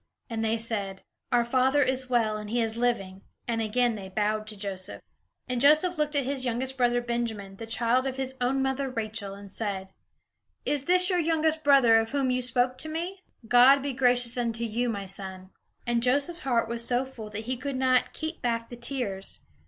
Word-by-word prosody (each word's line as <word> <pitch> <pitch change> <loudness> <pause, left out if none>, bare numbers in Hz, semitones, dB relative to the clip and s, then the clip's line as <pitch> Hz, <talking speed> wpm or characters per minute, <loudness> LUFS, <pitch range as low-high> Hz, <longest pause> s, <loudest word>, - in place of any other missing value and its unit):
And 225 -1 -2
they 225 +1 +1
said, 205 -4 -3 0.3
"Our 240 -1 +3
father 265 +3 +3
is 260 0 0
well 225 -4 +2
and 210 -1 -6
he 240 +2 0
is 225 -1 0
living." 215 -6 -1 0.3
And 230 -1 -1
again 235 +2 +1
they 195 -3 -7
bowed 215 +2 -1
to 215 -1 -7
Joseph. 195 -1 -4 0.5
And 250 -2 -2
Joseph 310 +4 +5
looked 300 0 0
at 280 - +2
his 270 -1 -1
younger 245 +1 -1
brother 245 -1 +2
Benjamin, 225 -5 -4
the 225 - -8
child 240 +3 +1
of 260 0 -4
his 265 0 -2
own 265 +2 +1
mother 265 0 -1
Rachel, 215 -4 -4
and 200 -1 -11
said: 195 -3 -4 0.7
"Is 290 -2 0
this 365 +2 +4
your 360 - +2
youngest 320 -1 +1
brother, 265 -6 +6
of 225 +3 -3
whom 270 -3 +1
you 250 0 0
spoke 250 +1 +1
to 315 - -5
me? 350 +4 -4 0.3
God 255 +4 +6
be 280 -1 -2
gracious 245 -1 +3
unto 235 -1 -1
you, 235 +2 -1
my 200 -3 -3
son." 190 -1 -4 0.3
And 240 -1 +1
Joseph's 285 +8 +1
heart 240 -7 0
was 235 0 -2
so 245 +2 +1
full 230 -5 -9
that 215 +1 -6
he 255 +2 -1
could 275 +2 -4
not 255 -1 +2
keep 315 +1 -5
back 230 -1 -1
the 240 - -8
tears. 235 -6 -3
245 Hz, 200 wpm, -27 LUFS, 220-265 Hz, 0.7 s, brother